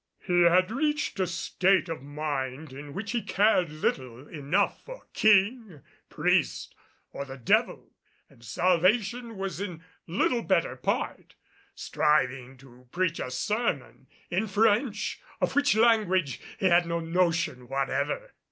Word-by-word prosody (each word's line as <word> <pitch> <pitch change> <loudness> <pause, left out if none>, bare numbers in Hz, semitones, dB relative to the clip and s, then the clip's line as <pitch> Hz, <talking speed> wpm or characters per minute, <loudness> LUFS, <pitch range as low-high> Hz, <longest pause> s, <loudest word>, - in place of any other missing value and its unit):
He 175 -2 +3
had 185 +3 +4
reached 295 -2 -1
a 185 - +1
state 185 +2 +1
of 165 -5 -5
mind 145 -1 -4
in 140 +1 -9
which 205 +1 -4
he 240 -1 -1
cared 200 -3 +2
little 130 -4 -3
enough 160 +6 -1
for - - -11
king, 210 - +2 0.3
priest, - - 0 0.4
or - - -5
the 135 -1 -9
devil, 120 - 0 0.4
and 115 - -21
Salvation 195 - +1
was 190 -2 -4
in 175 -5 -6 0.2
little 215 +7 +1
better 175 - +1
part, 125 - -3 0.4
striving 130 -3 0
to 125 -1 -18
preach 175 -2 -1
a - - -4
sermon 130 - -2 0.2
in 190 +5 0
French, 215 +2 +1 0.2
of - - 0
which 285 -4 +3
language 210 - +2 0.2
he - - -3
had 175 -1 +4
no 170 0 -1
notion 165 -6 0
whatever. 135 - -2
175 Hz, 135 wpm, -27 LUFS, 140-210 Hz, 0.4 s, had